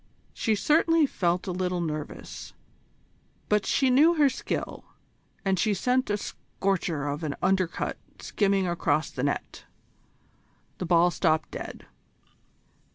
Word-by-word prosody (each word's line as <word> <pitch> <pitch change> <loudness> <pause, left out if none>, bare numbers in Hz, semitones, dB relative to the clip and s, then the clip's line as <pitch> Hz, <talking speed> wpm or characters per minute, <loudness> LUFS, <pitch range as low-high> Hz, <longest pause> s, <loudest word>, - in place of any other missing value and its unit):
She 220 -2 +1
certainly 320 +6 +3
felt 175 -8 0
a 190 - -2
little 180 0 -1
nervous, 155 -3 -5 1.0
but 210 -1 +2
she 265 -2 +3
knew 310 +7 +5
her 295 -3 +5
skill, 260 - -4 0.6
and 190 -2 +1
she 210 +1 +2
sent 250 +6 +1
a 205 - +1
scorcher 185 -7 -2
of 145 +2 -3
an 145 -3 -2
undercut 185 -3 0 0.2
skimming 195 -2 +1
across 170 -2 0
the 125 - -4
net. 140 +1 -3 1.1
The 180 - -3
ball 175 0 +4
stopped 155 -2 +1
dead. - - -7
190 Hz, 125 wpm, -27 LUFS, 170-220 Hz, 1.1 s, knew